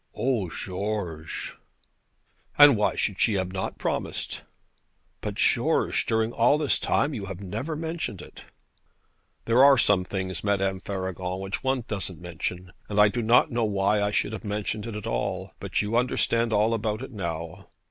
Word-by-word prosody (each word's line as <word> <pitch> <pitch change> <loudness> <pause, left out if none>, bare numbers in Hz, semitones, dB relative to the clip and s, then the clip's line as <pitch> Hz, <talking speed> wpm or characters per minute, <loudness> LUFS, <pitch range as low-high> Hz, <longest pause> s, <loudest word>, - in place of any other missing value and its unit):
'O, 120 -8 0
George!' 90 -4 -4 1.0
'And 145 -3 +9
why 105 - +1
should 100 -3 -1
she 110 - +3
not 95 -1 -2
have 95 - -3
promised?' - - -3 0.8
'But, - - -4
George; - - +2
during 110 0 +1
all 120 +6 +4
this 150 -2 +1
time 145 - +1
you 100 -6 -5
have 95 -1 -6
never 110 - -4
mentioned 160 +1 -4
it.' - - -12 1.0
'There 120 +3 +5
are 140 -1 +8
some 105 -5 +3
things, 95 -2 -4
Madame 95 -2 0
Faragon, 95 -1 -4
which 95 +5 -4
one 130 -2 0
doesn't 95 -5 -4
mention. 90 +1 -5 0.2
And 105 0 0
I 105 0 +7
do 120 +3 -2
not 115 +2 +4
know 120 -1 0
why 100 0 +1
I 100 - +1
should 105 +1 0
have 110 - -6
mentioned 105 +1 -3
it 115 - -5
at 105 - -6
all. - - -2
But - - -1
you 105 +2 -2
understand 115 -1 +1
all 110 +2 +3
about 110 +1 -2
it 135 - -8
now. 85 -2 -5
105 Hz, 170 wpm, -26 LUFS, 95-115 Hz, 1.0 s, And